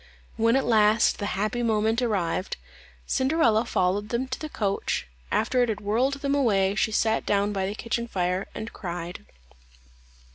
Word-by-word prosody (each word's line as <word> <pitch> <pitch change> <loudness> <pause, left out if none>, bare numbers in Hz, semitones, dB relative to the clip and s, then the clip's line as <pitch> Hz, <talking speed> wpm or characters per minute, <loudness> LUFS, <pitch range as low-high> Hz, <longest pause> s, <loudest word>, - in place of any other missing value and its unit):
When 230 +1 +3
at 270 - +2
last 215 -1 +4
the 205 - -2
happy 215 +4 -1
moment 220 0 +1
arrived, 190 -6 -1 0.5
Cinderella 260 - +2
followed 200 0 0
them 245 +3 -1
to 260 - -4
the 310 - -5
coach; 200 - -1 0.3
after 250 +3 +2
it 245 - +2
had 210 -2 -2
whirled 230 +7 +1
them 280 0 0
away, 200 -9 +2
she 215 +1 0
sat 220 +1 +1
down 205 0 +1
by 190 -1 -1
the 200 - -4
kitchen 235 +1 -3
fire 185 -2 -1
and 225 - -6
cried. 175 -1 -6
220 Hz, 160 wpm, -26 LUFS, 200-235 Hz, 0.5 s, last